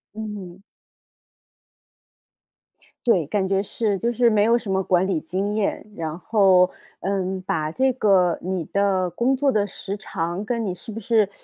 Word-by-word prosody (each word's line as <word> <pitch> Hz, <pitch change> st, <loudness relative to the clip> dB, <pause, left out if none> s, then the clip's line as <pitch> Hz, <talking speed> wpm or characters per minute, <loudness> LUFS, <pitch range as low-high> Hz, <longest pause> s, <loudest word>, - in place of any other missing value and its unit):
嗯。 200 Hz, -4 st, -7 dB, 2.4 s
对， 180 Hz, -, +3 dB
感 190 Hz, +2 st, 0 dB
觉 195 Hz, 0 st, +2 dB
是， 205 Hz, -1 st, -1 dB
就 235 Hz, +1 st, 0 dB
是 240 Hz, 0 st, +4 dB
没 210 Hz, -2 st, +3 dB
有 235 Hz, +1 st, +4 dB
什 205 Hz, -5 st, -5 dB
么 190 Hz, 0 st, +2 dB
管 185 Hz, 0 st, +2 dB
理 185 Hz, -5 st, 0 dB
经 195 Hz, +6 st, -2 dB
验， 210 Hz, -1 st, -1 dB
然 160 Hz, 0 st, -4 dB
后， 190 Hz, -3 st, +4 dB, 0.3 s
嗯， 190 Hz, -1 st, -2 dB
把 155 Hz, -4 st, -1 dB
这 260 Hz, +10 st, +2 dB
个 190 Hz, -7 st, +3 dB
你 185 Hz, -1 st, -2 dB
的 195 Hz, -2 st, +1 dB
工 240 Hz, +10 st, +1 dB
作 275 Hz, 0 st, +2 dB
的 205 Hz, -3 st, +1 dB
时 200 Hz, +1 st, -6 dB
长， 175 Hz, 0 st, -4 dB
跟 230 Hz, -1 st, -1 dB
你 185 Hz, -, -2 dB
是 180 Hz, -, -11 dB
不 225 Hz, +1 st, -6 dB
是， 215 Hz, -2 st, +2 dB
195 Hz, 175 characters per minute, -23 LUFS, 185-215 Hz, 2.4 s, 是